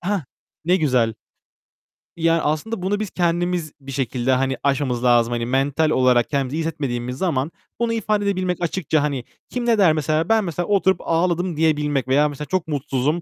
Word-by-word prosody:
Hah, 190 -2 -1 0.4
ne 180 +2 +3
güzel. 125 - +1 1.0
Yani 165 0 +2
aslında 155 +9 -2
bunu 200 +3 0
biz 215 -2 -3
kendimiz 175 -2 0
bir 135 0 -8
şekilde 130 -1 -1
hani 130 0 +1
aşmamız 135 -3 0
lazım. 120 -1 +4
Hani 120 -1 -1
mental 140 +5 +1
olarak 125 -4 +3
kendimizi 140 0 -1
iyi - - -1
hissetmediğimiz 130 -6 -3
zaman 155 -3 -1 0.3
bunu 235 -1 0
ifade 215 -2 0
edebilmek 185 -3 0
açıkça, 160 -3 0
hani, 140 -4 -2 0.3
kim 245 -1 -3
ne 235 -2 +3
der 185 -6 +5
mesela? 155 +1 0
Ben 225 -1 +4
mesela 175 -1 -3
oturup 190 -2 +2
ağladım 170 0 0
diyebilmek 150 -4 +1
veya 145 +3 +3
mesela 145 +1 -6
çok 185 +1 -1
mutsuzum, 145 +2 -1
155 Hz, 175 wpm, -21 LUFS, 135-180 Hz, 1.0 s, der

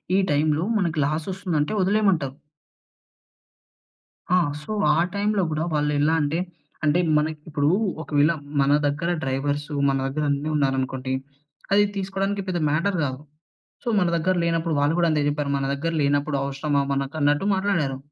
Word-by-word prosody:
ఈ - - +5
టైమ్‌లో 150 +2 +2 0.2
మనకి 170 -4 -1
లాసొస్తుందంటే 160 +2 -1
వదిలేయమంటారు. 185 -9 +1 2.0
ఆ! - - +6 0.2
సో 215 - -8 0.2
ఆ - - +2
టైంలో 205 0 +1
గుడా 155 +1 -1
వాళ్ళెలా 150 +1 +2
అంటే, 150 +3 0 0.4
అంటే 155 +4 +3 0.2
మనకి 155 +1 -1
ఇప్పుడు 145 -1 0 0.3
ఒకవేళ 145 +1 +2 0.3
మన 140 +1 +3
దగ్గర 150 +4 -1
డ్రైవర్సు 145 +3 -2 0.2
మన 135 - +1
దగ్గర 150 +3 -2
అన్నీ 145 +2 -1
ఉన్నారనుకోండి. 130 -2 -1 0.6
అది 205 0 +6
తీసుకోవడానికి 195 +1 -2
పెద్ద 175 -2 -1
మ్యాటర్ 180 +5 0
కాదు. 130 -1 -2 0.6
సో - - -4
మన 180 -3 +2
దగ్గర 185 +3 +1
లేనప్పుడు 165 -1 0
వాళ్ళు 145 +3 +2
కూడా 170 -1 +3
అంతే 150 -1 +1
చెప్పారు, 145 -1 -1
మన 135 - -1
దగ్గర 165 +4 -2
లేనప్పుడు 145 +1 +1
అవసరమా 140 +1 0
మనకు 140 +2 -2
అన్నట్టు 145 +6 +2
మాట్లాడారు. 185 -9 0
150 Hz, 140 wpm, -24 LUFS, 145-175 Hz, 2.0 s, ఆ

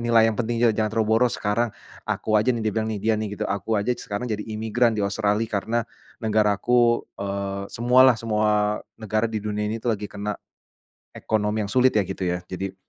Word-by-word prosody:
nilai 115 -1 +5
yang 110 - -2
penting 120 0 -1
juga, 120 -2 +4
"Jangan 110 -1 0
terlalu 110 -1 0
boros 125 -1 +2
sekarang. 110 +2 0 0.3
Aku 110 -1 0
aja 125 +4 +3
nih," 115 - -3
dia 110 - 0
bilang 110 +1 -1
nih, 105 -2 -3
dia 110 +2 +2
nih 105 -1 -2
gitu, - - -2
"aku 105 +2 -1
aja 105 - -4
sekarang 105 +4 -5
jadi 105 -1 -3
imigran 110 +2 +1
di - - -1
Australia 105 +2 0
karena 115 +3 -1 0.4
negara 110 -2 +2
aku, 120 -1 +3 0.2
eee, 100 0 -3
semualah, 125 +2 +5
semua 105 -2 +1 0.2
negara 110 +1 0
di 110 -2 -3
dunia 105 0 -2
ini 110 +1 -3
tuh 120 -1 0
lagi 105 - -7
kena 105 0 -4 0.8
ekonomi 105 0 -1
yang 100 - -8
sulit 130 +2 +4
ya, 105 - +4
gitu 95 -1 -4
ya," 90 0 0
jadi 95 +1 -4
110 Hz, 205 wpm, -24 LUFS, 105-115 Hz, 0.8 s, nilai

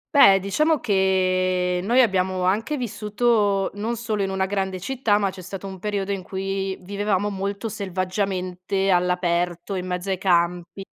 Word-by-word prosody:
Beh, 195 -9 +8
diciamo 305 - +1
che 185 -3 +1
noi 235 +7 +2
abbiamo 185 -3 0
anche 220 +11 0
vissuto, 210 -3 +1
non 220 +4 -3
solo 220 -3 -2
in 195 - 0
una 190 0 0
grande 190 -1 -2
città, 225 0 +1
ma 200 -2 0
c'è 185 -1 -10
stato 190 +1 -7
un 190 -1 -7
periodo 200 0 -2
in 195 -2 -2
cui 195 0 -3
vivevamo 205 +1 -1
molto 200 +3 -3
selvaggiamente 190 -1 -2
all'aperto, 175 0 0
in 185 -1 -3
mezzo 180 +2 -3
ai 190 - -1
campi 175 0 0
195 Hz, 155 wpm, -23 LUFS, 185-205 Hz, -, Beh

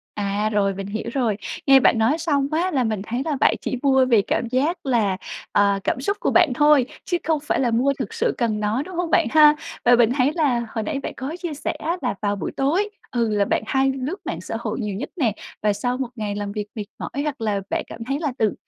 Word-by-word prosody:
À, 205 +1 -1
rồi, 200 -2 +1
mình 195 0 -5
hiểu 210 +2 -4
rồi. 235 -7 0 0.3
Nghe 270 -1 +7
bạn 235 - +4
nói 230 +8 +2
xong 290 -4 +1
á 345 +4 +1
là 265 -7 +1
mình 215 -3 -1
thấy 240 +5 -3
là 305 -3 -1
bạn - - +4
chỉ - - -3
mua 265 -2 +4
vì 230 -5 +4
cảm 230 +4 -1
giác 280 +8 -1
là 220 -7 +2 0.4
ờ, 200 -1 +3
cảm - - 0
xúc 400 +10 -1
của - - +1
bạn 345 -6 +4
thôi 295 -2 +5 0.2
chứ 350 - 0
không 315 0 +1
phải 300 - 0
là 250 -3 +2
mua 250 +5 +2
thực 260 - -4
sự - - 0
cần 220 -3 0
nó, 215 +5 0
đúng 365 +3 -8
hông 350 -1 -1
bạn 335 - +4
ha? 305 -1 +7 0.3
Và 245 - +6
mình 235 0 +4
thấy 270 +2 +3
là 255 -8 +1
hồi 220 0 -3
nãy 275 +6 -3
bạn - - -5
có 275 +5 -5
chia 340 -4 -3
sẻ 285 - -3
á 335 +3 -3
là 250 - 0
vào 205 -1 0
buổi - - -4
tối, 350 +10 +1 0.2
thường 230 -3 +1
là 205 -1 +2
bạn - - 0
hay 270 +2 +2
lướt 270 +7 -3
mạng - - -3
xã 225 - -5
hội 225 +1 -3
nhiều 210 -3 -3
nhất 195 - -5
nè, 250 - +1 0.3
và 210 - +3
sau 245 +5 -2
một 260 -2 -2
ngày 210 -2 -3
làm 205 -1 -4
việc 210 -1 -4
mệt 210 -2 -4
mỏi 280 - -4
hoặc 290 -4 -3
là 210 -3 0
bạn - - -1
cảm 230 - -8
thấy 275 +4 -2
là 295 -5 -1
tự 215 -2 +2
250 Hz, 260 wpm, -22 LUFS, 215-290 Hz, 0.4 s, Nghe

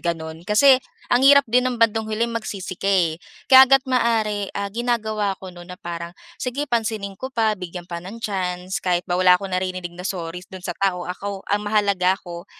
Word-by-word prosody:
gano'n. 165 0 -4
Kasi 260 +5 +6 0.3
ang 245 - +4
hirap 280 0 +7
din 250 +2 +2
ng 250 - -3
bandang 225 -1 +2
huli 220 +2 0
magsisi 215 -5 -5
ka, 195 - -4
eh. 170 -5 +2 0.3
Kaya 265 0 +10
hanggat 270 0 +5
maaari, 225 -5 0
ah, 200 0 -3
ginagawa 220 -4 -1
ko 190 - -7
no'n 175 0 -12
na - - -20
parang 170 0 -7 0.3
sige 260 +3 -2
pansinin 220 -4 -1
ko 260 - -4
pa 220 -2 +2
bigyan 180 -1 -7
pa 170 -1 -6
ng 190 +6 -9
chance. 185 -2 -3
Kahit 180 -1 0
ba 175 -1 -1
wala 180 -1 +6
akong 195 0 -7
naririnig 185 -1 -3
na 180 +2 -6
sorry 175 -2 -5
do'n 185 -1 -10
sa 190 - -2
tao, 185 -3 0
ako 195 +2 -5
ang 205 0 0
mahalaga 200 -3 +2
ako 175 0 -10
195 Hz, 200 wpm, -22 LUFS, 180-225 Hz, 0.3 s, Kaya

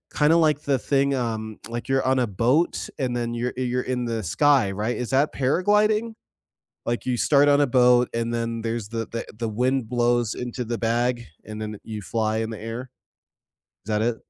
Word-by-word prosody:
kinda, 155 +3 +4
like, 155 -3 +3
the 135 -3 +1
thing, 140 +3 +1
um 110 -3 -3
like, 120 +3 -5
you're 135 0 +1
on 130 0 +2
a 125 - +1
boat, 125 - +1
and 125 -3 -1
then 120 -1 -2
you're 120 +1 -2
you're 125 0 0
in 125 -1 -2
the 115 -2 -2
sky, 130 - +3
right? 105 +5 -2
Is 125 - -4
that 140 +3 +2
paragliding? 210 - +2 0.7
Like, 120 0 -2
you 125 -2 0
start 145 +2 +4
on 145 0 +5
a 145 - +3
boat, 125 -1 +4
and 115 0 -1
then 115 0 -2
there's 115 -2 -3
the 115 -1 -3
the 115 - -4
the 115 -1 -2
wind 125 +2 0
blows 120 -2 +1
into 125 0 -4
the 120 +1 -3
bag, 120 +1 0 0.2
and 110 +1 -7
then 105 -1 -5
you 110 -2 -6
fly 110 +1 -1
in 110 0 -2
the 110 - -7
air. 115 +3 -6 1.0
Is 110 - -5
that 105 0 +1
it? 115 0 0
120 Hz, 200 wpm, -24 LUFS, 115-130 Hz, 1.0 s, on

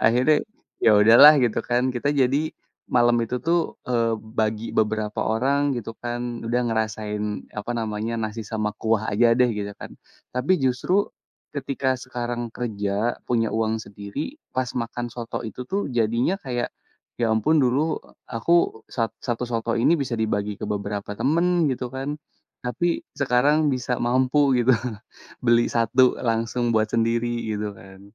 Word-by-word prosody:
Akhirnya, 125 +7 +4 0.5
ya, 110 - +7
udahlah 115 +8 +9
gitu, 115 - 0
kan, 120 0 +2
kita 125 +4 -1
jadi 130 +2 +3 0.6
malam 120 0 +5
itu, 125 +2 -3
tuh, 170 +1 +4 0.3
eee, 115 -2 +2 0.3
bagi 110 0 0
beberapa 110 -1 0
orang 140 +5 +1
gitu, 115 -1 -5
kan, 120 0 -3 0.3
udah 120 +2 +1
ngerasain 110 -2 -2 0.4
apa 105 - -5
namanya 110 +1 -2
nasi 110 +1 -3
sama 105 0 -2
kuah 110 -1 +1
aja, 120 +4 +4
deh, 125 -1 +5
gitu, 100 -1 -4
kan. - - -8 0.4
Tapi 125 +8 +1
justru 155 +11 +1 0.4
ketika 135 -2 -1
sekarang 120 -1 -4
kerja, 105 -1 -2
punya 115 -2 +2
uang 110 0 0
sendiri 105 - -6 0.2
pas 130 -1 0
makan 120 0 -3
soto 120 -2 -5
itu, 115 +3 -6
tuh, 200 +2 0
jadinya 115 - +1
kayak, 120 -2 -2 0.5
ya, 115 - +2
ampun 150 +9 +2
dulu 140 +5 +1 0.3
aku 115 0 +1
sa 115 -3 -1
satu 120 0 -2
soto 115 -1 -1
ini 115 +7 +4
bisa 135 -4 -2
dibagi 105 -2 -1
ke - - -3
beberapa 100 0 -3
temen 170 +2 +2
gitu, 125 -1 -3
kan, 135 +3 -3 0.5
tapi 125 +8 -1 0.3
sekarang 145 +4 +3
bisa 125 -1 -2
mampu 130 +3 +3
gitu 120 +2 +4 0.7
beli 120 0 +5
1 120 +2 +3
langsung 115 +1 0
buat 110 0 +2
sendiri 115 +1 +1 0.2
gitu, 105 0 -3
kan. 95 0 -14
120 Hz, 145 wpm, -24 LUFS, 110-130 Hz, 0.7 s, udahlah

